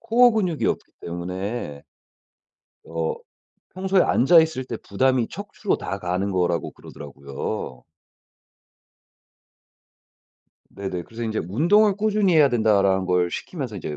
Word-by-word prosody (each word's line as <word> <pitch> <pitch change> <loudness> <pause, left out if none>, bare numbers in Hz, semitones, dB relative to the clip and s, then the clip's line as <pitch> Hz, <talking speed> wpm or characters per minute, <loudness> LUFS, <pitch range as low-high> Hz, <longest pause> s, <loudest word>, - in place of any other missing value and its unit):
코어 240 +2 +5
근육이 185 -8 -1
없기 - - -2
때문에 90 -2 -5 1.0
어 80 0 -2 0.6
평소에 190 0 +2
앉아 165 +7 +5
있을 160 -5 -1
때 120 - -5
부담이 125 +4 0
척추로 205 0 -3
다 100 - -4
가는 90 +2 -2
거라고 90 -2 0
그러더라고요. 70 -3 -7 2.9
네네. 95 -3 -5
그래서 115 +6 -9
인제 110 -1 -2
"운동을 195 - +4
꾸준히 210 -4 +2
해야 150 -3 +6
된다."라는 100 -5 +2
걸 90 -1 +1
시키면서 130 - -5
인제 75 -5 -5
110 Hz, 270 characters per minute, -23 LUFS, -, 2.9 s, 해야